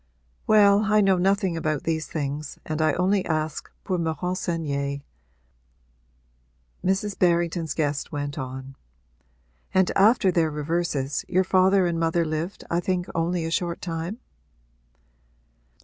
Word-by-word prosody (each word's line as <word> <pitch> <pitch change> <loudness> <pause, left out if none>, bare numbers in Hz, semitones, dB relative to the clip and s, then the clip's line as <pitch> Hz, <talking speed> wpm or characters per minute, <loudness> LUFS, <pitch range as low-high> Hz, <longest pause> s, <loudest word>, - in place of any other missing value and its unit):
'Well, 210 -1 +5
I 215 0 +4
know 195 -3 +3
nothing 195 -1 +1
about 155 -3 -1
these 160 -1 -1
things 145 -1 -4
and 155 0 -2
I 155 -2 +3
only 190 +2 +2
ask 155 -1 -2
pour 185 -3 -1
me 165 -1 0
renseigner,' 150 -4 -2 1.8
Mrs. 195 +2 -1
Berrington's 170 -3 +1
guest 145 -2 -1
went 145 -1 -4
on. 130 0 -6 1.0
'And 190 -1 +4
after 200 -1 +5
their 165 -2 +2
reverses 150 -2 -2
your 185 +1 +2
father 190 +1 +4
and 170 -1 -1
mother 165 0 +1
lived 155 +4 -4
I 170 - 0
think 180 0 -1
only 165 +1 0
a 165 - -3
short 175 -1 -1
time?' 170 +4 -4
170 Hz, 130 wpm, -25 LUFS, 155-185 Hz, 1.8 s, Well